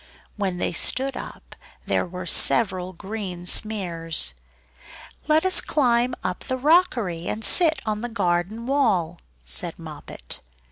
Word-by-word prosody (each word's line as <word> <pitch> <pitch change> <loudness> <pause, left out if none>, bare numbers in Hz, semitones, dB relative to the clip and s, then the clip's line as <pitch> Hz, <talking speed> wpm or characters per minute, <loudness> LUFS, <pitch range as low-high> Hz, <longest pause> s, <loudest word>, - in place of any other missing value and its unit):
When 195 -4 -2
they - - -1
stood 265 +10 0
up - - -9 0.3
there - - 0
were 180 +1 -7
several 185 -1 +3
green 190 -1 -7
smears! 170 - 0 0.9
"Let 310 +3 +3
us 375 - +6
climb 245 -3 +1
up 180 -1 -2
the 260 -1 -4
rockery, 250 - +2
and 215 0 -1
sit 320 - +5
on 215 -1 -2
the 240 - -4
garden 200 +1 -1
wall," 205 - +1 0.3
said 65 +2 0
Moppet. - - -9
205 Hz, 130 wpm, -23 LUFS, 175-250 Hz, 0.9 s, us